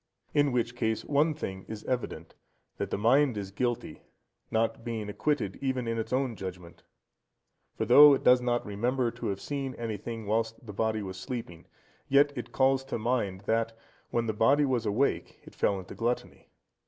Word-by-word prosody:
In 145 -1 +3
which 120 -1 0
case, 110 -2 -1
one 150 +2 +2
thing 95 -10 -5
is 110 -1 -7
evident, 115 -10 -3 0.4
that - - -3
the - - -1
mind 125 +3 +3
is 100 -1 -5
guilty, 120 -5 -2 0.5
not 115 +1 0
being 115 -3 -4
acquitted 105 -3 -1
even 130 -3 -1
in 115 0 -1
its 110 - -4
own 130 -2 0
judgement; 90 -3 -8 0.9
for - - -1
though 145 -1 +9
it - - -5
does 125 0 +6
not 120 -1 0
remember 120 +4 0
to - - -5
have 100 -1 -2
seen 135 -1 -4
anything 115 0 -5
whilst 110 +2 -1
the 105 - -8
body 110 +1 0
was 95 -1 -6
sleeping, 115 -8 -6 0.4
yet 145 +1 +5
it 120 -2 -6
calls 135 +1 +3
to 135 - -3
mind 110 -5 -1
that, 115 +2 -1 0.3
when 120 -1 0
the 110 - -1
body 135 +7 +4
was 125 -5 0
awake, 115 +7 0
it - - -14
fell 100 - +1
into 95 -1 -8
gluttony. 120 +1 -3
115 Hz, 180 wpm, -29 LUFS, 105-130 Hz, 0.9 s, though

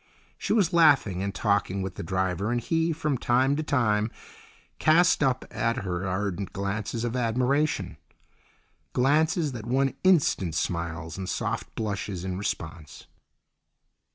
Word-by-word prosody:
She - - -3
was 195 -6 +3
laughing 140 - +4
and 100 0 -1
talking 100 -2 0
with 95 -1 -4
the - - -7
driver, 95 +3 -1
and 120 - +1
he, 165 +7 0
from 150 -4 -1
time 130 +4 +2
to 155 - -1
time, 115 -8 +1 0.7
cast 170 +3 +4
up 130 -3 +1
at 115 0 -1
her 90 0 -3
ardent 95 0 -2
glances 105 +3 -3
of 120 0 -2
admiration—glances 140 +3 -1
that 115 -3 -7
won 135 +2 +1
instant 145 - +3
smiles 85 0 -3
and 95 0 -4
soft 115 0 -3
blushes 100 -4 -3
in 95 -1 -3
response. 80 -5 -5
115 Hz, 130 wpm, -27 LUFS, 95-140 Hz, 0.7 s, laughing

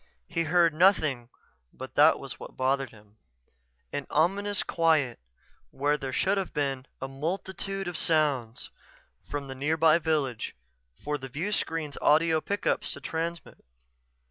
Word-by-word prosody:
He 165 - -1
heard 170 0 +4
nothing 155 -8 +3 0.4
but - - -9
that - - +6
was - - -8
what - - -10
bothered 135 0 +1
him; 105 -1 -19 0.8
an 145 - -3
ominous 195 +6 +1
quiet 160 -7 +2 0.5
when 145 +2 0
there 135 -1 -4
should 195 +9 +1
have 190 - -5
been 135 -2 -1
a 135 - -4
multitude 190 +7 -4
of 175 - -4
sounds 145 -9 0 0.6
from 145 -1 -4
the 135 - -6
nearby 155 +4 +3
village 150 -8 -1 0.5
for 150 0 -2
the 135 0 -7
viewscreen's 160 - -2
audio 160 +1 +4
pickups 200 +3 -1
to - - -8
transmit. 165 +4 -5
155 Hz, 135 wpm, -28 LUFS, 135-170 Hz, 0.8 s, that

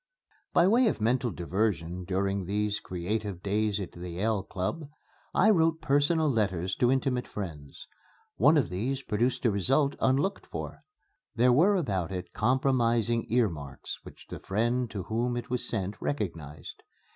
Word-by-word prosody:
By 170 - +5
way 235 +4 +5
of 210 - 0
mental 120 +3 +1
diversion 90 -2 -2
during 95 +1 -1
these 105 +1 0
creative 95 +1 -4
days 105 +1 0
at 95 -4 -5
the 90 +1 -8
Yale 100 +4 0
Club, 140 - -4 0.4
I 220 - +5
wrote 165 -4 +3
personal 150 +2 +2
letters 95 - 0
to 120 - +3
intimate 130 -2 0
friends. 80 -9 -7 0.5
One 145 - +5
of 135 - +2
these 130 +9 -2
produced 120 +4 0
a 115 - +5
result 135 +8 +2
unlooked 140 +10 +1
for. - - -6 0.5
There 125 +1 +4
were 180 +10 +5
about 95 - -1
it 90 -1 -5
compromising 120 -2 +1
earmarks 85 - -1
which - - -13
the - - -7
friend 120 +4 0
to 100 -4 -5
whom 120 +4 -1
it 120 - -6
was 125 -1 -2
sent 100 -1 -3
recognized. 85 - -4
110 Hz, 150 wpm, -29 LUFS, 95-130 Hz, 0.5 s, By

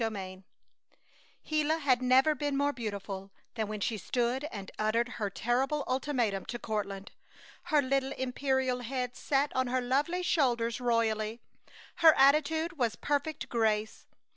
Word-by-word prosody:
CHAPTER 225 -1 -1
XXVI 190 -1 -7 1.0
Gila 310 +1 +1
had 265 -5 +2
never 260 +4 +4
been 290 -1 -2
more 285 +1 +1
beautiful 200 -4 -5 0.2
than 220 -3 -2
when 215 0 -5
she 220 +1 -1
stood 245 +6 -1
and 200 -10 -7
uttered 230 +3 +1
her 210 -4 -3
terrible 260 +8 0
ultimatum 250 -7 0
to 240 - -5
Courtland. 200 -4 -4 0.5
Her 295 -2 +3
little 270 0 0
imperial 260 0 -1
head 250 0 -3
sat 285 +1 0
on 260 0 +1
her 255 +1 0
lovely 285 +9 0
shoulders 240 -8 +1
royally, 225 -2 0 0.6
her 320 -2 +7
attitude 310 +4 +3
was 230 -3 +1
perfect 290 +1 -2
grace. 220 -2 -1
250 Hz, 140 wpm, -30 LUFS, 220-280 Hz, 1.0 s, her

